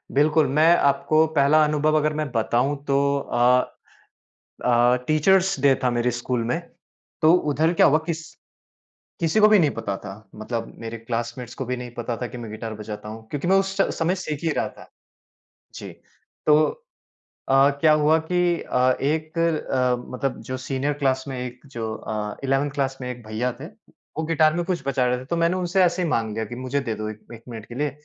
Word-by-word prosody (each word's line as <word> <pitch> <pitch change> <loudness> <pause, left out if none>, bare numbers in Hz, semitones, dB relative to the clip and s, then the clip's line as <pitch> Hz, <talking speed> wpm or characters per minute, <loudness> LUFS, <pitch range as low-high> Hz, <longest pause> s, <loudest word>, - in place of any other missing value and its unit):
बिल्कुल, 150 +2 +4
मैं 155 +5 +5
आपको 155 +3 +3
पहला 150 +2 +5
अनुभव 150 +1 +1
अगर 155 0 +1
मैं 155 -1 -2
बताऊँ 120 +4 +1
तो 140 - +2 0.4
अ 120 - +1 1.3
अ, 120 0 +4
टीचर्स 185 +2 +3
डे 140 0 +5
था 125 - +3
मेरे 120 +1 +1
स्कूल 120 0 -2
में। 165 - 0 0.6
तो 160 +1 +6 0.2
उधर 160 +4 +2
क्या - - +5
हुआ 150 - +5
किस 165 -1 -2 1.0
किसी 165 +5 +1
को 215 - +7
भी 215 -2 +6
नहीं 155 -4 +3
पता 105 -4 -4
था, 95 -1 -8 0.2
मतलब 115 +1 -5
मेरे 115 0 -6
क्लासमेट्स 120 +1 -5
को 135 - -4
भी 125 +1 -3
नहीं 125 -1 -7
पता 120 0 -3
था 120 - -2
कि 125 - -9
मैं 115 -2 -7
गिटार 110 0 -6
बजाता 105 0 -7
हूँ 110 0 -10
क्योंकि 145 +3 -3
मैं 190 - +4
उस 195 0 0
च - - +1
समय 175 +3 0
सीख 155 -6 -4
ही 165 - +1
रहा - - 0
था। - - -16 0.9
जी, - - -7 0.6
तो 150 0 +6 0.9
अ, 135 +1 +5
क्या 155 -1 +5
हुआ 155 +1 +4
कि 180 -1 +2
अ, 125 0 +2
एक 155 +3 -1
अ, 135 -6 +1 0.2
मतलब 130 +1 -2
जो 130 - -1
सीनियर 140 0 -1
क्लास 130 -1 +1
में 130 -2 -5
एक 125 0 -6
जो 115 -4 -5
अ, 105 -1 -5
इलेवेंथ 135 +2 +1
क्लास 135 -2 -2
में 125 0 -4
एक 120 -1 -8
भैया 115 +4 -2
थे, 155 - -6
वो 200 -5 -10
गिटार 155 -1 +3
में 175 - -1
कुछ 175 -4 -2
बजा 130 -2 +1
रहे 125 0 +1
थे। 125 - -9
तो 170 +6 -3
मैंने 170 +2 +2
उनसे 185 +1 +1
ऐसे 175 +1 +1
ही 170 - 0
माँग 115 -7 0
लिया 110 0 -2
कि 120 - -8
मुझे 130 +2 -2
दे 115 -5 -3
दो 110 0 -5
एक 110 0 -12
एक 115 - -13
मिनट 110 -3 -8
के 120 - -10
लिए। 145 +3 -1
135 Hz, 205 wpm, -23 LUFS, 120-155 Hz, 1.3 s, को